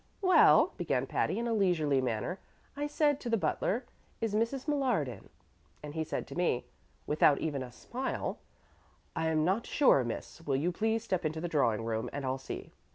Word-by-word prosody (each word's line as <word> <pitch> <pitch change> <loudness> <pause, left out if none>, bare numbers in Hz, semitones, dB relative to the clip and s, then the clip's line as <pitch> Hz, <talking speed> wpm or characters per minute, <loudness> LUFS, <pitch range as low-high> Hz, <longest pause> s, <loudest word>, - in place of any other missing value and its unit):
"Well," 370 -1 +6
began - - 0
Patty, - - 0
in 235 +1 -1
a 230 - 0
leisurely 165 -10 +2
manner, 125 - -2 0.4
"I 290 0 -2
said 295 -1 +2
to 245 - -5
the 230 - +3
butler, 230 +4 0 0.3
'Is 225 -2 -1
Mrs. 230 +6 0
Millard 260 - +1
in?' 125 - -9 0.5
and 150 -1 -7
he 160 0 -1
said - - -3
to - - -7
me 175 -8 0 0.4
(without 150 -1 +4
even 145 -4 -2
a 125 -1 -6
smile), 250 - -4 0.8
'I 165 -1 0
am 155 -1 +2
not 195 +6 0
sure, 260 - +4
miss; 120 +7 -6
will 145 -4 -1
you 160 +7 +1
please 220 +4 0
step 185 -6 -1
into 155 0 -2
the 175 - -2
drawing 115 -9 +1
room 110 -1 -2
and 145 -1 -4
I'll 130 +1 -1
see.' 130 - -7
165 Hz, 190 wpm, -31 LUFS, 140-230 Hz, 0.8 s, Well